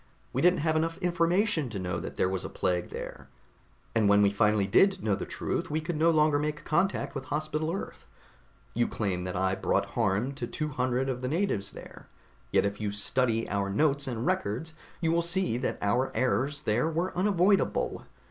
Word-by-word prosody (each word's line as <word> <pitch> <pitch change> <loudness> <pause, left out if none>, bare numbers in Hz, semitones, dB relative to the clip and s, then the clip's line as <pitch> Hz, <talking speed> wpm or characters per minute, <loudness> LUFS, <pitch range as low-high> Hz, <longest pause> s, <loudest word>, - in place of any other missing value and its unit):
We 130 - 0
didn't 180 -1 +4
have 160 0 +1
enough 165 +1 0
information 175 - +1
to 110 - -5
know 90 -2 -2
that 85 - -7
there - - +2
was 95 0 -2
a - - -5
plague 90 -1 -1
there, - - -8 0.6
and 110 -3 +3
when 100 0 +5
we 100 - +4
finally 105 0 +2
did 190 - +3
know 105 -2 +1
the - - -3
truth - - -3
we 155 - 0
could 160 +2 -3
no 160 +2 +3
longer 155 -2 +3
make 150 +1 -3
contact 180 +6 0
with 135 -2 -5
Hospital 155 +2 -2
Earth. 195 - -6 0.7
You 120 +1 +1
claim 95 -4 -2
that 90 - -4
I 95 +1 +1
brought 95 - 0
harm 105 +8 +1
to 140 - -5
two 155 -1 -3
hundred 130 -1 0
of 125 -2 -2
the 130 - -2
natives 145 - 0
there, - - -12 0.4
yet - - +3
if 100 +1 -3
you 105 -1 -1
study 115 +3 0
our 100 -1 -1
notes 140 +6 +1
and 120 -2 -3
records, 125 +11 -1 0.3
you 165 -1 +2
will 170 +1 +3
see 170 -5 +1
that 130 - -2
our 120 +6 +1
errors 130 +5 0
there 120 +9 +1
were 170 +3 -2
unavoidable. 195 +1 +1
130 Hz, 195 wpm, -28 LUFS, 105-165 Hz, 0.7 s, when